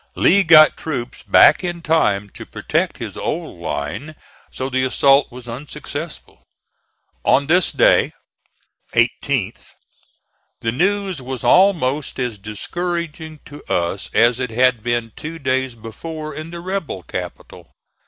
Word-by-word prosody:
Lee 200 Hz, +2 st, +5 dB
got 155 Hz, -2 st, +7 dB
troops 130 Hz, -6 st, -5 dB
back -, -, +6 dB
in 175 Hz, -1 st, -4 dB
time 105 Hz, -12 st, +1 dB
to -, -, -10 dB
protect -, -, -2 dB
his -, -, -6 dB
old -, -, -4 dB
line, 80 Hz, -, -4 dB, 0.4 s
so 130 Hz, -, -4 dB
the 130 Hz, -1 st, 0 dB
assault 135 Hz, +2 st, +3 dB
was 125 Hz, 0 st, -11 dB
unsuccessful. 150 Hz, +5 st, -8 dB, 0.8 s
On 140 Hz, -, +3 dB
this 175 Hz, +4 st, +3 dB
day -, -, +4 dB, 0.8 s
(18th) -, -, 0 dB, 0.9 s
the 115 Hz, -, 0 dB
news 190 Hz, -, 0 dB
was 130 Hz, 0 st, -6 dB
almost 155 Hz, -7 st, +3 dB
as 125 Hz, -5 st, -3 dB
discouraging 160 Hz, -, -5 dB
to 145 Hz, +1 st, -12 dB
us 85 Hz, +3 st, -1 dB
as 120 Hz, +1 st, +3 dB
it 125 Hz, -2 st, -2 dB
had 125 Hz, 0 st, +2 dB
been 120 Hz, 0 st, -1 dB
two 160 Hz, +2 st, -7 dB
days 130 Hz, -3 st, -1 dB
before 155 Hz, +8 st, -7 dB
in 155 Hz, +1 st, -7 dB
the 170 Hz, 0 st, -8 dB
rebel 180 Hz, -, -4 dB
capital. -, -, -8 dB
140 Hz, 130 wpm, -20 LUFS, 120-165 Hz, 0.9 s, got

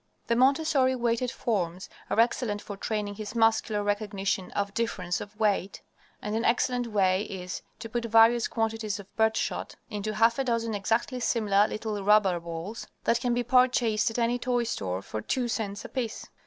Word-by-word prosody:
The 235 Hz, -, +1 dB
Montessori 270 Hz, +1 st, +3 dB
weighted 240 Hz, 0 st, 0 dB
forms 185 Hz, -7 st, -2 dB, 0.2 s
are -, -, 0 dB
excellent 230 Hz, -2 st, +2 dB
for 205 Hz, -, -7 dB
training 205 Hz, 0 st, -3 dB
his 215 Hz, +2 st, -7 dB
muscular 225 Hz, -2 st, +2 dB
recognition 205 Hz, -2 st, -1 dB
of 200 Hz, -1 st, -2 dB
difference 210 Hz, -6 st, -2 dB
of 210 Hz, +1 st, -10 dB
weight, 200 Hz, -3 st, 0 dB, 0.4 s
and 210 Hz, +1 st, -2 dB
an 225 Hz, -, 0 dB
excellent 245 Hz, 0 st, +1 dB
way 190 Hz, -3 st, +2 dB
is 180 Hz, -3 st, -6 dB, 0.2 s
to 225 Hz, +1 st, -7 dB
put 235 Hz, +1 st, -3 dB
various 230 Hz, +1 st, +5 dB
quantities 225 Hz, -2 st, -2 dB
of 200 Hz, -1 st, -13 dB
birdshot 220 Hz, 0 st, 0 dB, 0.2 s
into 215 Hz, 0 st, -3 dB
half 230 Hz, +3 st, +3 dB
a -, -, +2 dB
dozen 230 Hz, -3 st, -1 dB
exactly 225 Hz, +5 st, 0 dB
similar 210 Hz, -4 st, +2 dB
little 215 Hz, -2 st, -4 dB
rubber 200 Hz, -3 st, +4 dB
balls 170 Hz, +6 st, -6 dB, 0.2 s
that 230 Hz, -, +2 dB
can 245 Hz, -1 st, +1 dB
be 245 Hz, -, 0 dB
purchased 245 Hz, -3 st, +3 dB
at 225 Hz, -, -5 dB
any 240 Hz, +1 st, +1 dB
toy 245 Hz, -1 st, 0 dB
store 95 Hz, -, -3 dB
for 110 Hz, -, -5 dB
two 245 Hz, -, -1 dB
cents 205 Hz, -3 st, -3 dB
apiece. 240 Hz, -4 st, -4 dB
220 Hz, 170 wpm, -28 LUFS, 205-235 Hz, 0.4 s, various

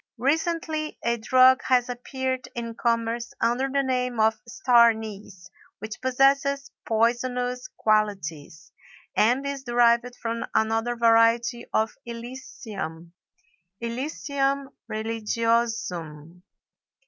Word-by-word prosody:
Recently 310 Hz, +3 st, -1 dB
a 235 Hz, 0 st, +1 dB
drug 255 Hz, +3 st, +5 dB
has 250 Hz, -1 st, +3 dB
appeared 260 Hz, +1 st, -3 dB
in 230 Hz, -1 st, -4 dB
commerce 230 Hz, 0 st, -1 dB
under 245 Hz, +4 st, +1 dB
the 275 Hz, +1 st, +1 dB
name 250 Hz, -2 st, -1 dB
of 220 Hz, 0 st, +2 dB
star 245 Hz, -11 st, +5 dB
anise 210 Hz, -5 st, -7 dB, 0.3 s
which 220 Hz, +1 st, -8 dB
possesses 275 Hz, +2 st, +2 dB, 0.2 s
poisonous 245 Hz, +2 st, 0 dB
qualities, 175 Hz, -8 st, -1 dB, 0.4 s
and 245 Hz, +5 st, +3 dB
is 280 Hz, -1 st, -4 dB
derived 240 Hz, 0 st, +3 dB
from 230 Hz, 0 st, -3 dB
another 225 Hz, +2 st, +1 dB
variety 230 Hz, +1 st, +3 dB
of 220 Hz, 0 st, +1 dB
Illicium 225 Hz, -8 st, -7 dB, 0.7 s
(Illicium 275 Hz, +3 st, -2 dB, 0.2 s
religiosum). 220 Hz, -7 st, -2 dB
235 Hz, 95 wpm, -25 LUFS, 220-260 Hz, 0.7 s, drug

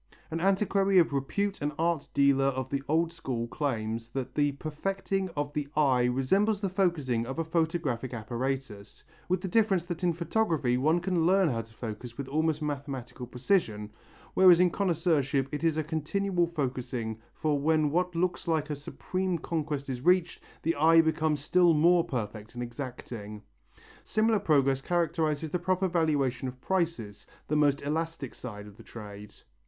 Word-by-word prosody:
An 165 Hz, -, -2 dB
antiquary 195 Hz, 0 st, +2 dB
of 165 Hz, -5 st, +4 dB
repute 195 Hz, +9 st, -1 dB
and 145 Hz, +1 st, -1 dB
art 165 Hz, -3 st, 0 dB
dealer 140 Hz, -1 st, +4 dB
of 130 Hz, -1 st, -1 dB
the 140 Hz, -1 st, -1 dB
old 165 Hz, +2 st, +2 dB
school 130 Hz, -8 st, -4 dB
claims 115 Hz, -4 st, -3 dB
that 130 Hz, +1 st, -4 dB
the 145 Hz, -1 st, +1 dB
perfecting 190 Hz, +6 st, -3 dB
of 145 Hz, 0 st, -2 dB
the 150 Hz, -1 st, -2 dB
eye 130 Hz, -5 st, +4 dB
resembles 190 Hz, -, +2 dB
the 200 Hz, -2 st, -1 dB
focussing 150 Hz, -, 0 dB
of 135 Hz, -, -5 dB
a 165 Hz, -, 0 dB
photographic 160 Hz, -7 st, -1 dB
apparatus, 120 Hz, -2 st, -4 dB, 0.3 s
with 185 Hz, 0 st, +1 dB
the 190 Hz, -, -3 dB
difference 195 Hz, -3 st, +2 dB
that 175 Hz, 0 st, -5 dB
in 175 Hz, -, +3 dB
photography 165 Hz, -, 0 dB
one 155 Hz, +7 st, +2 dB
can 175 Hz, -2 st, +1 dB
learn 190 Hz, -2 st, +4 dB
how 115 Hz, -4 st, -1 dB
to 115 Hz, 0 st, -15 dB
focus 115 Hz, +1 st, -7 dB
with 140 Hz, -, -5 dB
almost 155 Hz, +2 st, 0 dB
mathematical 135 Hz, -4 st, -5 dB
precision, 120 Hz, -, 0 dB, 0.4 s
whereas 180 Hz, -2 st, +7 dB
in 180 Hz, -1 st, +4 dB
connoisseurship 155 Hz, -8 st, +1 dB
it 150 Hz, +1 st, -4 dB
is 160 Hz, -2 st, +2 dB
a 155 Hz, -, +1 dB
continual 175 Hz, +4 st, 0 dB
focussing 125 Hz, -7 st, -3 dB, 0.2 s
for 150 Hz, -2 st, 0 dB
when 155 Hz, 0 st, +2 dB
what 180 Hz, +2 st, 0 dB
looks 175 Hz, +1 st, -1 dB
like 155 Hz, -2 st, 0 dB
a -, -, -1 dB
supreme 185 Hz, +5 st, -3 dB
conquest 155 Hz, -4 st, -3 dB
is 125 Hz, -2 st, -4 dB
reached, 180 Hz, +2 st, +2 dB, 0.2 s
the 165 Hz, -, +1 dB
eye 165 Hz, +2 st, +6 dB
becomes 160 Hz, -2 st, +2 dB
still 175 Hz, +1 st, +4 dB
more 170 Hz, +3 st, +5 dB
perfect 110 Hz, -4 st, -5 dB
and 120 Hz, -, -3 dB
exacting. 120 Hz, -4 st, -7 dB, 0.6 s
Similar 220 Hz, 0 st, +2 dB
progress 135 Hz, -5 st, +2 dB
characterizes 160 Hz, -2 st, 0 dB
the 180 Hz, -, 0 dB
proper 185 Hz, +2 st, +1 dB
valuation 145 Hz, -7 st, 0 dB
of 130 Hz, 0 st, -7 dB
prices, 160 Hz, -, -2 dB, 0.2 s
the 150 Hz, -, 0 dB
most 145 Hz, -2 st, +2 dB
elastic 155 Hz, -2 st, -3 dB
side 105 Hz, -4 st, -8 dB
of 105 Hz, 0 st, -14 dB
the -, -, -12 dB
trade. 105 Hz, -2 st, -10 dB
150 Hz, 165 wpm, -29 LUFS, 130-175 Hz, 0.6 s, whereas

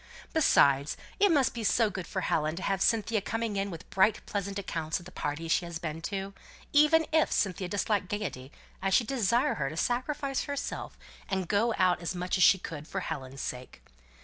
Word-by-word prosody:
Besides, 140 Hz, -, +4 dB, 0.2 s
it 405 Hz, -2 st, +5 dB
must 280 Hz, -5 st, +3 dB
be 235 Hz, -, -4 dB
so 220 Hz, +1 st, +3 dB
good 185 Hz, -2 st, -6 dB
for 190 Hz, -, -3 dB
Helen 155 Hz, -2 st, 0 dB
to 185 Hz, -, -6 dB
have 195 Hz, -1 st, 0 dB
Cynthia 225 Hz, -1 st, +2 dB
coming 225 Hz, +1 st, -2 dB
in 195 Hz, 0 st, -1 dB
with 170 Hz, -1 st, -9 dB
bright 205 Hz, +3 st, +3 dB
pleasant 200 Hz, -1 st, -3 dB
accounts 165 Hz, -5 st, -2 dB
of 175 Hz, -, -11 dB
the 185 Hz, -, -11 dB
parties 160 Hz, 0 st, -3 dB
she 175 Hz, -, +2 dB
has 170 Hz, -1 st, -5 dB
been 165 Hz, -1 st, -5 dB
to 195 Hz, -1 st, -4 dB, 0.4 s
even 300 Hz, +2 st, +5 dB
if 315 Hz, -1 st, +3 dB
Cynthia 185 Hz, -2 st, 0 dB
disliked 200 Hz, +1 st, 0 dB
gaiety 175 Hz, -11 st, -4 dB, 0.3 s
I 195 Hz, -, +1 dB
should 230 Hz, +5 st, +3 dB
desire 245 Hz, +3 st, +1 dB
her 140 Hz, -2 st, -2 dB
to 155 Hz, -, -8 dB
sacrifice 275 Hz, -, -1 dB
herself 285 Hz, -1 st, -5 dB, 0.3 s
and 190 Hz, -2 st, -1 dB
go 220 Hz, +4 st, +2 dB
out 185 Hz, -2 st, +3 dB
as 170 Hz, +2 st, -3 dB
much 180 Hz, +1 st, -1 dB
as -, -, +6 dB
she 190 Hz, -, +7 dB
could, 155 Hz, -4 st, -7 dB
for 195 Hz, -, -3 dB
Helen's 135 Hz, -5 st, -5 dB
sake. 125 Hz, 0 st, -6 dB
195 Hz, 200 wpm, -29 LUFS, 165-230 Hz, 0.4 s, she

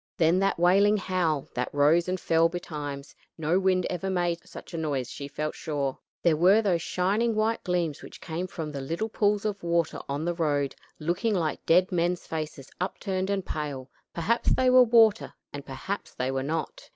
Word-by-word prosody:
Then 165 Hz, +2 st, +4 dB
that 195 Hz, 0 st, +1 dB
wailing 195 Hz, +5 st, +4 dB
howl 175 Hz, -7 st, 0 dB
that 125 Hz, 0 st, -2 dB
rose 150 Hz, +5 st, +3 dB
and 185 Hz, 0 st, -1 dB
fell 165 Hz, 0 st, +3 dB
betimes; 145 Hz, -5 st, -6 dB, 0.2 s
no 160 Hz, +3 st, +1 dB
wind 185 Hz, -1 st, +2 dB
ever 185 Hz, +1 st, -3 dB
made 175 Hz, -2 st, 0 dB
such -, -, -11 dB
a -, -, -3 dB
noise 140 Hz, -6 st, -2 dB
she 140 Hz, -, -6 dB
felt 150 Hz, +2 st, -3 dB
sure. 140 Hz, -4 st, -3 dB, 0.2 s
There 170 Hz, -3 st, +4 dB
were 185 Hz, +7 st, +5 dB
those 190 Hz, -6 st, +1 dB
shining 205 Hz, +7 st, 0 dB
white 220 Hz, +1 st, 0 dB
gleams 175 Hz, -5 st, -1 dB
which -, -, -11 dB
came 175 Hz, +2 st, -4 dB
from 160 Hz, -4 st, -5 dB
the 140 Hz, -2 st, -5 dB
little 165 Hz, +11 st, -3 dB
pools 210 Hz, -1 st, +1 dB
of 205 Hz, -2 st, -2 dB
water 170 Hz, -1 st, 0 dB
on 145 Hz, +3 st, -2 dB
the 175 Hz, -, 0 dB
road, 145 Hz, -5 st, 0 dB, 0.2 s
looking 175 Hz, +8 st, 0 dB
like 160 Hz, -4 st, -1 dB
dead 180 Hz, +3 st, +4 dB
men's 175 Hz, 0 st, 0 dB
faces 155 Hz, -4 st, -5 dB
upturned 190 Hz, 0 st, -2 dB
and 195 Hz, -2 st, -1 dB
pale; 140 Hz, -4 st, -5 dB, 0.2 s
perhaps 215 Hz, +8 st, 0 dB
they 255 Hz, -1 st, +3 dB
were 255 Hz, 0 st, +8 dB
water 225 Hz, -3 st, +4 dB, 0.2 s
and 145 Hz, -1 st, -7 dB
perhaps 145 Hz, +9 st, -5 dB
they 130 Hz, +1 st, -1 dB
were 135 Hz, 0 st, -1 dB
not. 155 Hz, +2 st, -4 dB
170 Hz, 190 wpm, -27 LUFS, 150-190 Hz, 0.2 s, were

